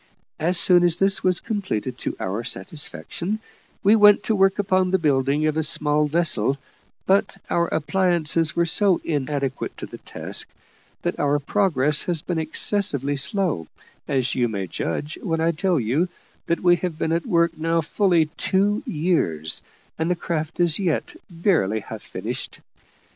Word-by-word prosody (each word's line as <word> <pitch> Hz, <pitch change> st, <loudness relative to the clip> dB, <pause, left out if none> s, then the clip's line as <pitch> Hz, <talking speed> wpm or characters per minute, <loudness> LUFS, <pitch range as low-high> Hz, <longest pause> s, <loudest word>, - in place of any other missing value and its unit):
As 175 Hz, +3 st, +1 dB
soon 175 Hz, 0 st, +6 dB
as 175 Hz, -1 st, +2 dB
this 195 Hz, 0 st, +1 dB
was 180 Hz, -2 st, +2 dB
completed 185 Hz, -, -3 dB
to -, -, -3 dB
our 100 Hz, +5 st, -3 dB
satisfaction, 150 Hz, -, -3 dB, 0.5 s
we 205 Hz, +3 st, +6 dB
went 210 Hz, -1 st, +6 dB
to 220 Hz, -, +1 dB
work 195 Hz, -1 st, +3 dB
upon 185 Hz, -2 st, +1 dB
the 190 Hz, -, +3 dB
building 145 Hz, -2 st, +1 dB
of 155 Hz, 0 st, 0 dB
a -, -, +2 dB
small 150 Hz, -1 st, +2 dB
vessel 145 Hz, -6 st, +1 dB, 0.5 s
but 195 Hz, +1 st, +2 dB
our 170 Hz, 0 st, +2 dB
appliances 165 Hz, -1 st, +1 dB
were 170 Hz, -, +2 dB
so 190 Hz, +2 st, +3 dB
inadequate 140 Hz, -3 st, -3 dB
to -, -, -6 dB
the -, -, -11 dB
task, -, -, -2 dB, 0.6 s
that -, -, -2 dB
our 145 Hz, 0 st, +2 dB
progress 150 Hz, -3 st, +1 dB
has 170 Hz, -3 st, -1 dB
been 175 Hz, -3 st, -2 dB
excessively 155 Hz, -3 st, 0 dB
slow, 155 Hz, -, 0 dB, 0.4 s
as 130 Hz, -2 st, 0 dB
you 125 Hz, -2 st, +1 dB
may 100 Hz, -4 st, -3 dB
judge 120 Hz, -, -4 dB
when 165 Hz, -4 st, -1 dB
I 165 Hz, +1 st, +2 dB
tell 175 Hz, 0 st, 0 dB
you 135 Hz, +10 st, 0 dB, 0.4 s
that 170 Hz, -, 0 dB
we 175 Hz, -1 st, +4 dB
have 170 Hz, -3 st, -4 dB
been 160 Hz, -, -1 dB
at 165 Hz, 0 st, -1 dB
work 170 Hz, -1 st, +2 dB
now 165 Hz, +1 st, 0 dB
fully 170 Hz, 0 st, +2 dB
two 195 Hz, +7 st, 0 dB
years, 150 Hz, -, -1 dB, 0.4 s
and 160 Hz, +1 st, 0 dB
the 180 Hz, -, +2 dB
craft 165 Hz, -1 st, -4 dB
is 175 Hz, -1 st, +3 dB
yet 175 Hz, -6 st, -1 dB
barely 165 Hz, -, +1 dB
half -, -, -8 dB
finished. -, -, -6 dB
165 Hz, 160 wpm, -23 LUFS, 145-185 Hz, 0.6 s, soon